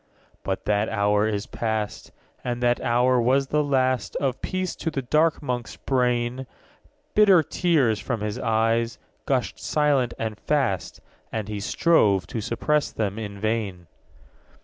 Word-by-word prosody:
_15 - - -41 0.3
3. - - -34
But 95 -1 -3
that 105 +1 +1
hour 105 0 +2
is 105 -1 -2
past; 110 -2 -3 0.3
And 120 0 -3
that 120 0 +2
hour 125 +1 +3
was 130 +3 +3
the 150 +2 +1
last 130 -3 0
Of 135 -3 -1
peace 185 -1 -2
to - - -2
the 140 -4 -3
dark 155 +5 +2
Monk's 125 -4 -3
brain. 125 0 0 0.7
Bitter 195 -6 +6
tears, 145 - +1
from 120 -5 -3
his 105 +3 -3
eyes, 115 +1 +1 0.3
gushed 130 -5 0
silent 145 -5 +1
and 110 -2 -4
fast; 130 - -1 0.3
And 110 -3 -3
he 105 -1 -4
strove 100 - +3
to 115 - -2
suppress 145 +7 0
them 105 -1 -2
in 100 -2 -6
vain. 105 -5 -2
120 Hz, 150 wpm, -24 LUFS, 110-135 Hz, 0.7 s, Bitter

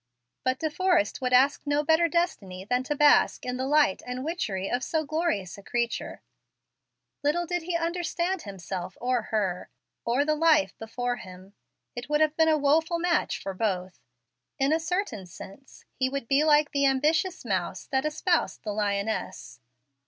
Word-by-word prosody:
But 255 0 +1
De 315 +2 -2
Forrest 360 - +1
would 250 -1 -1
ask 265 +3 +4
no 290 0 +1
better 320 +2 +4
destiny 200 - -2
than 250 +4 +1
to 295 - -1
bask 295 0 +4
in 250 0 -3
the 260 +1 -2
light 295 -8 +3
and 250 +2 -4
witchery 200 - -2
of 245 +4 -1
so 315 +3 -1
glorious 285 - -2
a - - -11
creature. 235 +3 -3 1.0
Little 305 +5 +1
did 355 +1 -2
he 340 +1 -3
understand 345 +1 -2
himself 190 -2 -6
or 250 0 0
her, 195 -5 -1 0.3
or 250 +5 +1
the 305 - +2
life 310 -1 +3
before 245 +2 -3
him. 185 -1 -12 0.4
It 245 +3 -7
would 300 0 +2
have 310 0 +2
been 320 0 +4
a 310 - +4
woful 320 +4 +2
match 345 0 0
for 195 - -5
both. 185 -3 -2 0.6
In 275 +3 +2
a 320 - +2
certain 320 - -3
sense 195 +9 -13
he 260 -1 0
would 275 -3 -4
be 275 +4 +3
like 300 -1 +4
the 280 -1 +2
ambitious 310 +7 +1
mouse - - -2
that 265 -1 0
espoused 325 +4 0
the 210 - -3
lioness. 200 - -3
275 Hz, 170 wpm, -27 LUFS, 220-320 Hz, 1.0 s, ask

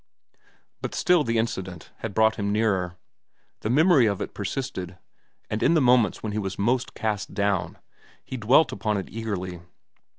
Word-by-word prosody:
But - - -4
still 175 -4 +3
the 115 -2 0
incident 95 -7 -3
had 110 -4 -6
brought 110 0 +3
him 100 -1 -1
nearer. 95 -5 0 0.6
The 110 - -3
memory 150 -1 +5
of 100 -2 -1
it - - -5
persisted, 95 -4 -4 0.5
and 105 - -3
in 170 - +4
the - - +5
moments 125 -6 +3
when 110 - -2
he 105 - -2
was 95 -2 -4
most 120 +5 0
cast 105 -3 -3
down, 100 -2 0 0.5
he - - -6
dwelt 130 +7 +4
upon 105 -2 -1
it 95 - -5
eagerly. 95 -6 -4
110 Hz, 165 wpm, -25 LUFS, 100-120 Hz, 0.6 s, memory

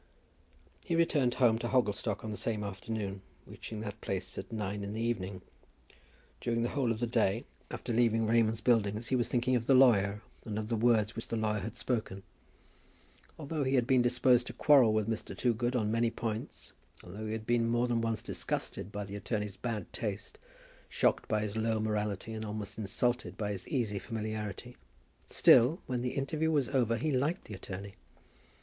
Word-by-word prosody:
He 170 - -1
returned 145 -7 +2
home 115 -3 +4
to 120 - -2
Hogglestock 105 -4 0
on 110 - -4
the - - -4
same 105 -1 -2
afternoon, 100 -1 -4 0.2
reaching 110 -1 -8
that 105 -1 -6
place 95 -1 -4
at - - -7
nine 105 -2 -3
in 100 +1 -4
the 110 - -3
evening. 100 -5 -2 1.0
During 115 -1 0
the 120 - 0
whole 130 -5 0
of 110 - -2
the 120 - +1
day 115 -2 +1 0.2
after 120 - -4
leaving 115 -1 +3
Raymond's 115 0 +2
Buildings 110 -2 +2
he 130 - +2
was 120 -2 +1
thinking 125 +1 +1
of 115 -1 -1
the 135 - +6
lawyer, 105 -5 +5 0.2
and 105 -2 -4
of 110 0 -3
the 115 - +1
words 110 -2 +2
which 115 - -5
the - - -2
lawyer 105 -1 0
had 110 +4 -6
spoken. 110 -6 -2 1.1
Although 155 -1 -2
he 135 +1 +1
had 125 -2 +3
been 130 -1 +4
disposed 125 0 +3
to - - -5
quarrel 135 -7 +6
with 110 -1 +1
Mr. 115 -1 -3
Toogood 120 +1 +1
on 110 -3 +1
many 115 +1 +2
points, 115 -1 -5 0.3
although 100 +5 -7
he 110 - -3
had 110 0 -5
been 115 0 +2
more 120 +1 +2
than 120 -1 +1
once 115 -1 -1
disgusted 100 - -3
by 105 0 -4
the 100 +1 -7
attorney's 105 -1 -3
bad 110 -4 -4
taste, 105 -3 -5 0.5
shocked - - +1
by 110 -1 +1
his 105 0 -4
low 110 0 0
morality, 105 0 -2
and 110 0 -4
almost 105 0 -5
insulted 120 +4 -1
by 105 -1 -2
his 100 -3 -5
easy 110 -7 -1
familiarity, 110 -3 -5 0.5
still, 130 +9 +6
when 125 -2 -2
the 125 0 -2
interview 155 +3 0
was 145 -5 +1
over, 115 -3 +2
he 150 +7 -1
liked 145 +7 0
the 105 - -9
attorney. 95 0 -7
115 Hz, 190 wpm, -31 LUFS, 105-120 Hz, 1.1 s, the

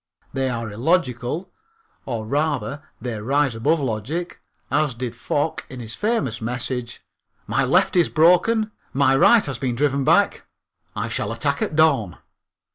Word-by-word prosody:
They 135 -1 0
are 115 -3 -4
illogical 130 - -1 0.6
or 115 -4 -3
rather 145 +2 -1 0.2
they 120 -4 -4
rise 140 +3 +1
above 145 +9 +1
logic, 135 +8 -3 0.3
as 145 -2 +1
did 120 -1 -5
Foch 145 +5 -1
in 130 - -8
his 115 -2 -6
famous 180 - -1
message: 125 +1 -4 0.4
"My 120 +6 +1
left 180 +11 +3
is 175 -2 +4
broken, 195 +7 +3 0.2
my 135 0 +3
right 220 +10 +5
has 135 -4 -5
been 125 -3 -1
driven 140 +1 +1
back, 195 +8 +2 0.5
I - - -2
shall - - -2
attack - - -1
at 210 -8 -1
dawn." 150 - +3
135 Hz, 145 wpm, -22 LUFS, 120-160 Hz, 0.6 s, right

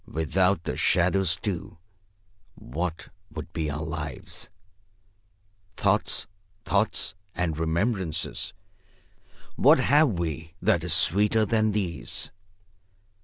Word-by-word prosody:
"Without 90 +4 +1
the - - -3
shadows, 90 -1 +3
too, 90 -5 -4 0.8
what 80 +6 -4 0.2
would 80 - -8
be 80 -3 -1
our 75 +2 -3
lives? 80 +6 -5 1.3
Thoughts, 100 +1 +2 0.4
thoughts 100 -1 +1 0.2
and 85 -3 -1
remembrances, 85 +1 -1 1.1
what - - +6
have 150 +3 +5
we 80 -1 -4
that - - +2
is - - +2
sweeter 105 +5 +4
than 110 -1 +2
these? 85 - -2
90 Hz, 95 wpm, -26 LUFS, 80-100 Hz, 1.3 s, what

